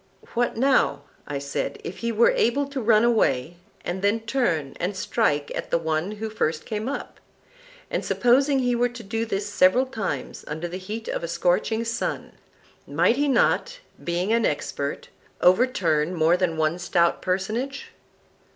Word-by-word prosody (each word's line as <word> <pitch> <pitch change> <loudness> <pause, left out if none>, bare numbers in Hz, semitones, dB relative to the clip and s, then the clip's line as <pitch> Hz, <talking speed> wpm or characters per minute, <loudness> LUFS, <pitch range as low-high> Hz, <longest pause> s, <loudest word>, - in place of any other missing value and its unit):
What, 240 -2 0
now, 270 +3 +2 0.2
I 145 - -3
said, 140 0 -3
if 180 - -6
he 235 0 -1
were 230 +1 +4
able 280 +5 +2
to 275 -1 -5
run 220 -1 +4
away 175 - +2 0.3
and 180 +2 -3
then 205 +3 +2
turn 220 - -1
and 185 +3 -2
strike 150 -7 0
at - - -4
the - - +2
one 160 +4 -1
who 215 +1 -4
first 165 -7 -2
came 215 +3 -3
up? 280 - -6 0.7
And - - -1
supposing 270 +3 +3
he 250 -2 +1
were 245 +1 +2
to 240 -1 -10
do 225 +3 -2
this 200 -2 -2
several 205 +5 +4
times 220 - -4
under 160 +3 -4
the 175 +2 -5
heat 215 +4 -6
of - - -3
a - - -2
scorching 180 +7 +1
sun, 230 +1 -3 0.6
might 240 - +2
he 290 +1 +2
not, 470 - +2 0.3
being 175 +5 0
an 230 0 +2
expert, 145 -3 -2 0.3
overturn 180 -6 +3
more 165 +1 +4
than 180 -3 0
one 160 +2 +1
stout 170 -1 +1
personage? 215 +9 -2
210 Hz, 165 wpm, -24 LUFS, 170-240 Hz, 0.7 s, were